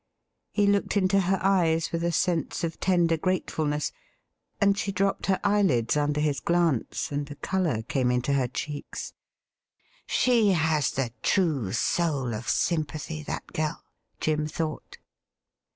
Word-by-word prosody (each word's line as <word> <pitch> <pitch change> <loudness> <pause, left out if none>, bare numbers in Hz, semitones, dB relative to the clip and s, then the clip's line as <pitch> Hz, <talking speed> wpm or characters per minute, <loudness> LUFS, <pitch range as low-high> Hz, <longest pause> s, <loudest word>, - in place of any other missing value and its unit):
He 205 - +1
looked 200 +1 +2
into 195 0 +3
her 190 +1 +1
eyes 170 -4 +2
with 170 0 -2
a 170 - +1
sense 170 0 0
of 165 -1 -3
tender 175 -3 +2
gratefulness, 155 -5 -1 0.7
and 200 0 +4
she 200 0 -2
dropped 195 +1 0
her 190 -1 +2
eyelids 190 - +2
under 150 0 +1
his 150 -2 +1
glance, 170 -9 0
and 145 0 -3
a 145 - -7
colour 165 - -1
came 125 0 0
into 125 +3 +1
her 135 -3 +2
cheeks. 145 +4 -6 0.5
' - - -44 0.2
She 230 -6 +3
has 160 -4 +2
the 130 -3 -2
true 150 - +1
soul 140 -2 0
of 110 +2 -4
sympathy, 155 -1 -1
that 150 - -5
girl,' 155 -1 -2 0.4
Jim 155 -1 0
thought. 155 0 -4
160 Hz, 145 wpm, -27 LUFS, 145-185 Hz, 0.7 s, and